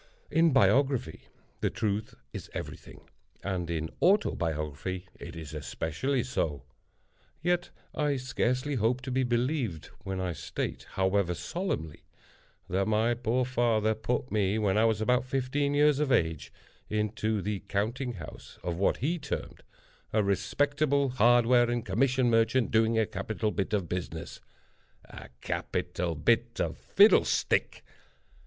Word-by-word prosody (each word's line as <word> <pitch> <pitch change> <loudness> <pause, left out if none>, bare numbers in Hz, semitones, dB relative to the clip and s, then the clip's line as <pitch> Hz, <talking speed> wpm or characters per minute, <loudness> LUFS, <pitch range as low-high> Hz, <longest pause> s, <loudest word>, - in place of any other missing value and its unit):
In 165 0 +4
biography 135 - +2 0.3
the - - +1
truth 105 -1 -2 0.2
is - - -7
every - - -4
thing, - - -15 0.4
and 90 -3 -2
in 80 -1 -2
autobiography 90 - 0
it 85 0 -8
is 80 -2 -8
especially 80 - -2
so—yet 125 - -4 0.2
I 145 -1 +1
scarcely 130 +2 -1
hope 120 +3 +1
to 130 0 -5
be 130 +1 +1
believed 120 - -1
when 95 -1 -3
I 90 -2 -2
state, - - -5
however 95 -2 +1
solemnly, 85 - -4 0.6
that 95 +2 0
my 110 +2 +2
poor 120 +1 0
father 115 -3 +2
put 120 +3 -2
me, 105 -1 +1
when 100 -3 +1
I 110 +1 +4
was 110 -2 +1
about 125 +3 +2
fifteen 135 +2 -1
years 145 -1 +4
of 150 -2 +1
age, 80 - +1 0.4
into 110 0 -1
the 100 +1 -2
counting 120 +6 -1
house 85 -7 -10
of 85 -1 -2
what 100 - +1
be 165 +6 0
termed 150 - -5 0.5
"a 110 -1 +2
respectable 140 +9 +1
hardware 120 0 +4
and 120 -1 -1
commission 130 -1 +2
merchant 115 +1 +2
doing 110 0 +3
a 110 - +3
capital 105 +2 -2
bit 95 - -2
of 100 -5 0
business!" 85 -2 -5 0.6
A - - -11
capital 85 -1 -2
bit 115 +9 +1
of - - -1
fiddlestick! 205 +2 +3
110 Hz, 135 wpm, -29 LUFS, 95-130 Hz, 0.6 s, In